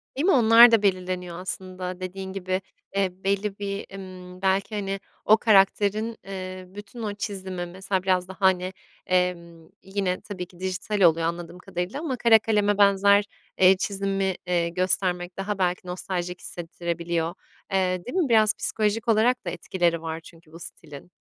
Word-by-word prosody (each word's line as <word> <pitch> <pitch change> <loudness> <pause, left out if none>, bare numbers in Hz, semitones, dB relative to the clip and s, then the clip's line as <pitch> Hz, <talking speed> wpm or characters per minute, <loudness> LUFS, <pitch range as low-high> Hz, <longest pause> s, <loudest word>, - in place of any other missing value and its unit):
Değil 280 +5 0
mi, 385 - +5
onlar 235 -2 +8
da 225 -2 +5
belirleniyor 180 -2 -1
aslında 185 0 -5
dediğin 190 +1 -6
gibi. 185 0 -2 0.3
Eee, 195 -1 +2
belli 200 +1 -1
bir, 200 0 -4
ımm, 185 -1 -10
belki, 195 +2 +1
hani, 195 -1 -2 0.3
o 215 - +6
karakterin, 210 +1 +3
eee, 185 -1 -6
bütün 205 +4 -9
o 210 -1 -2
çizimi. 190 -3 -5
Mesela 190 +1 -3
biraz 185 -1 +1
da, 190 - -9
hani, 185 -1 +2 0.3
emm, 170 -3 -1
yine 195 -1 -2
tabii 185 -4 -6
ki 175 0 -20
dijital 190 +2 -2
oluyor 165 -2 +5
anladığım 170 +1 -5
kadarıyla. 180 +7 -4
Ama 300 -5 -2
kara 230 -2 +6
kaleme 205 -2 +1
benzer, 200 0 +5 0.3
eee, 190 0 +6
çizimi, 195 -1 -1
eee, 170 -1 +1
göstermek 180 0 -1
daha 200 +1 -2
belki 180 -1 -1
nostaljik 180 0 -4
hissettirebiliyor. 170 -1 -3 0.4
Eee, 185 -2 0
değil 300 - -4
mi? 335 -8 +2
Biraz 215 -2 +5
psikolojik 215 +1 -1
olarak 230 +2 +3
da - - -1
etkileri 170 -1 -1
var 160 0 -4
çünkü 165 0 -17
bu 165 - -11
stilin. 150 -1 -10
190 Hz, 160 wpm, -25 LUFS, 180-205 Hz, 0.4 s, onlar